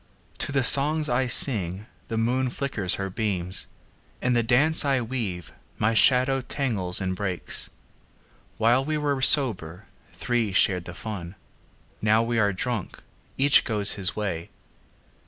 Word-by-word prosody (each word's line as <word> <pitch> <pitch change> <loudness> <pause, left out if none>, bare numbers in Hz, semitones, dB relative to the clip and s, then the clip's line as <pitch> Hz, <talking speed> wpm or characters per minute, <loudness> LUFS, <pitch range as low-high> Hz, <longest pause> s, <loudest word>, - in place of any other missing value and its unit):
To - - -2
the 135 -2 0
songs 150 +4 +4
I 125 +2 0
sing 105 -6 +2 0.2
the 115 - -4
moon 125 +3 0
flickers 120 -8 +1
her 95 -1 -5
beams; 95 -3 -1 0.5
In 125 - 0
the 120 - +2
dance 135 +8 +2
I 135 -2 +1
weave 110 -7 -5 0.2
my 110 +2 0
shadow 130 +3 +3
tangles 110 -10 -1
and 95 -2 -3
breaks. 95 -2 -2 0.9
While 120 +4 +2
we 155 +2 -2
were 145 -2 -2
sober, 105 - +2 0.3
three 120 -5 -2
shared 90 -3 +2
the 90 - -9
fun; 95 -4 -7 0.7
Now 110 +1 +2
we 115 0 -1
are 105 -1 +2
drunk, 110 +1 -5 0.3
each 140 +1 +4
goes 105 -3 +1
his 95 -3 -1
way. 95 -6 -4
115 Hz, 140 wpm, -24 LUFS, 95-130 Hz, 0.9 s, songs